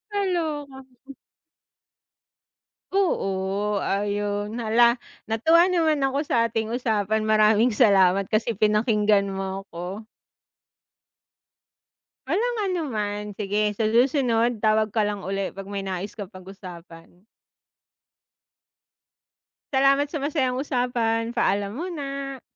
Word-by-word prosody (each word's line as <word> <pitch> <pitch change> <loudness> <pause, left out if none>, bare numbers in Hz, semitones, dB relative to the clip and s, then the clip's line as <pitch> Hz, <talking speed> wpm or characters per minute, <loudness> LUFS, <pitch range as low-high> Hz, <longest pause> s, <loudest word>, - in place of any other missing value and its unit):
Kaloka. 320 -9 -2 2.1
Oo, 200 - 0
ayun. 205 +2 -2
Hala, 235 +2 +3 0.2
natuwa 320 +11 +4
naman 315 -5 +2
ako 275 +2 0
sa 230 - +2
ating 225 +1 -2
usapan. 220 -3 0
Maraming 215 +2 +4
salamat, 195 -4 +4
kasi 215 +2 0
pinakinggan 210 -1 +2
mo 195 0 -4
ako. 185 +3 -7 2.2
Walang 460 - 0
anuman! 215 - -2
Sige 210 +1 -1
sa 215 +1 0
susunod 240 -2 +2
tawag 215 -1 +2
ka 220 - +2
lang 205 -2 -2
uli, 195 0 -2
'pag 195 0 -9
may 200 0 -4
nais 190 +1 -5
ka 205 -4 -7
pag-usapan. 180 -2 -12 2.5
Salamat 275 +2 +3
sa 310 - -3
masayang 270 -3 -1
usapan. 235 -4 -1
Paalam 200 -4 0
muna. 275 -6 -5
220 Hz, 95 wpm, -24 LUFS, 200-265 Hz, 2.5 s, natuwa